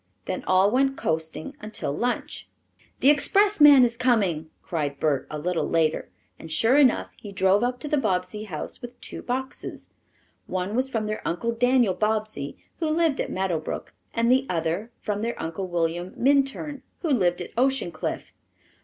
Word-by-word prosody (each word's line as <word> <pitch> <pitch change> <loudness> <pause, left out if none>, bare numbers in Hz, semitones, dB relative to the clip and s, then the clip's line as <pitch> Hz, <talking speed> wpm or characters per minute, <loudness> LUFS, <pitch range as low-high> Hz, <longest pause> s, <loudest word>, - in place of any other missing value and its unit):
Then 185 - -3
all 190 +2 +4
went 270 +1 +2
coasting 160 0 -3
until 215 -8 -4
lunch. 245 +6 -3 0.5
"The 275 - +7
expressman 295 -3 +6
is 235 -1 +1
coming!" 195 -12 +1
cried 145 -4 -3
Bert 145 -4 0
a 150 - -4
little 170 +3 -1
later, 160 -1 +1 0.3
and 165 - -10
sure 225 +10 +3
enough 275 -4 +4
he 205 - -9
drove 190 +1 +3
up 250 0 -1
to 300 - -4
the 295 0 +1
Bobbsey 210 -1 -1
house 165 -7 -6
with 245 0 -9
two - - -7
boxes. 260 +2 -5 0.6
One 185 +3 -2
was 260 +2 +1
from 225 -4 -1
their 215 0 -3
Uncle 180 +8 -1
Daniel 245 -3 +3
Bobbsey, 215 -8 -2 0.2
who 320 -2 0
lived 315 -2 +2
at - - -3
Meadow 185 -3 -1
Brook, 155 - -6 0.2
and 230 +1 +2
the 265 +1 +3
other 170 +5 -1
from 210 -1 -2
their 235 +1 -3
Uncle 165 +4 -4
William 175 +1 -2
Minturn, 280 +2 +1 0.2
who 330 - 0
lived 180 -10 +2
at 175 - -6
Ocean 265 -6 +1
Cliff. 155 - -5
215 Hz, 170 wpm, -25 LUFS, 175-260 Hz, 0.6 s, The